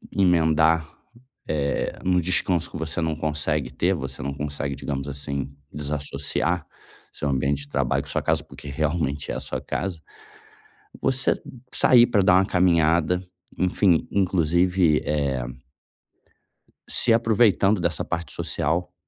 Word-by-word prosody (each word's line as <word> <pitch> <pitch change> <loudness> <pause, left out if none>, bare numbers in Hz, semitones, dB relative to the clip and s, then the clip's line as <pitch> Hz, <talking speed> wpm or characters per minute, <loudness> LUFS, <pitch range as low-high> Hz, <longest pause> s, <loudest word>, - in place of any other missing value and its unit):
emendar, 80 -3 +3 0.6
eh, 70 -2 -1
num 90 -1 +2
descanso 90 -1 0
que - - -7
você 80 +1 -3
não 80 -1 -1
consegue 75 -1 -2
ter, 95 +3 +1
você 65 -4 -6
não 70 0 -3
consegue, 70 -1 -4
digamos 70 -1 -4
assim, 70 -1 -4 0.2
desassociar 75 +3 -2 0.5
seu 75 - -3
ambiente 70 +2 0
de 70 - -13
trabalho 70 -3 0
com - - -15
a - - -2
sua - - 0
casa, - - 0
porque - - -12
realmente 75 0 -2
é - - -3
a - - -3
sua - - -5
casa, 95 -3 -4 1.0
você 135 0 +1 0.3
sair 120 -2 +7
pra 105 -5 +2
dar 90 - +5
uma 95 +1 +4
caminhada, 85 -1 +2 0.4
enfim, 90 -2 +2
inclusive, 90 -3 +2
eh 70 -3 -1 1.5
se 120 - +1
aproveitando 110 -3 +3
dessa 85 -3 -1
parte 85 0 -4
social, 85 +4 -2
80 Hz, 135 wpm, -24 LUFS, 70-90 Hz, 1.5 s, sair